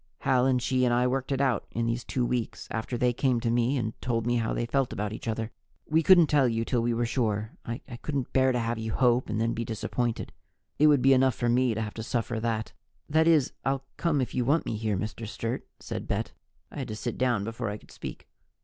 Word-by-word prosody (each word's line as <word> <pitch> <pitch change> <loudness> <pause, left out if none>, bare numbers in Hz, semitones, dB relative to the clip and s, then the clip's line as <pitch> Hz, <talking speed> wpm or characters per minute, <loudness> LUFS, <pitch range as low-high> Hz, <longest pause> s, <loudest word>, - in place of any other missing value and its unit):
"Hal 125 0 +3
and 130 -1 +3
she 130 +1 +1
and 125 - +3
I 125 +1 +3
worked 130 +2 -1
it 135 - 0
out 130 -6 +1
in 115 +1 -2
these 115 +1 -1
two 125 -2 -1
weeks, 120 -2 -2
after 115 +2 -3
they 125 0 +2
came 125 0 +1
to 115 - 0
me 120 +3 +2
and 110 -3 -2
told 115 -2 -1
me 120 0 +2
how 115 -1 0
they 120 - -1
felt 135 +1 0
about 105 +1 -3
each 110 - -7
other. 115 0 -2 0.4
We 160 +1 +3
couldn't 175 0 +7
tell 145 -3 +3
you 115 -1 0
till 120 -1 +1
we 120 +1 +1
were 120 +1 0
sure; 110 -3 -1 0.2
I 115 +2 -3 0.2
couldn't 140 -4 -3
bear 130 0 +4
to 125 - 0
have 115 -1 -1
you 110 -1 -3
hope 125 -2 +3
and 110 0 -1
then 115 +1 +1
be 115 - -2
disappointed 115 +1 -2 0.5
it 150 - +7
would 145 -4 +5
be 135 +1 +7
enough 130 -2 +4
for 120 - 0
me 125 -1 +3
to 110 - -2
have 105 - -5
to 110 - -6
suffer 115 0 -2
that." 110 -1 -2 0.3
"That 160 +2 +3
is, 155 -6 +4
I'll 135 0 -1
come 155 -5 +1
if 125 - -3
you 125 - +1
want 145 +7 +2
me - - -2
here, 105 -2 -1
Mr. 110 +3 -4
Sturt," 115 +3 -4
said - - -5
Bet. - - -1 0.4
I - - -7
had - - -3
to 110 - -5
sit 115 +2 -4
down 120 -5 +2
before 115 +1 -3
I 105 - -4
could - - -19
speak. - - -8
120 Hz, 250 wpm, -28 LUFS, 115-130 Hz, 0.5 s, couldn't